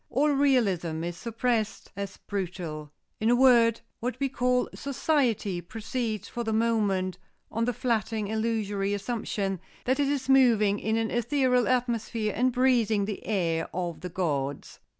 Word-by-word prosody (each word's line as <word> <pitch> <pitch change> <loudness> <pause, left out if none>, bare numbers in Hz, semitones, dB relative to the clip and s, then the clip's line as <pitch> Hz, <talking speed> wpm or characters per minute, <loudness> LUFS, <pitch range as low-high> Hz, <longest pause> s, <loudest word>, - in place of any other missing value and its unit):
All 280 +5 +2
realism 200 - +2
is 175 0 -3
suppressed 225 +1 -2
as 200 0 -5
brutal. 175 -6 -5 0.3
In 220 - +2
a 240 - +5
word, 235 -3 +5 0.2
what 245 +1 -3
we 275 -1 0
call 250 -1 +1
'society' 250 - 0
proceeds 220 +2 -4
for 240 - -4
the 220 - -2
moment 205 -5 +1 0.3
on 230 +1 0
the 245 - +1
flattering 220 -3 -1
illusory 210 -2 -1
assumption 200 -3 -2 0.3
that 260 +3 +1
it 285 - +3
is 275 -2 -1
moving 230 -7 +4
in 220 +1 0
an 225 -1 -1
ethereal 250 -1 +2
atmosphere 230 -4 0
and 255 +1 +2
breathing 235 -5 +2
the 205 -1 -5
air 165 -6 0
of 170 -3 -3
the 180 - -5
gods. 145 -6 -3
220 Hz, 150 wpm, -27 LUFS, 195-250 Hz, 0.3 s, a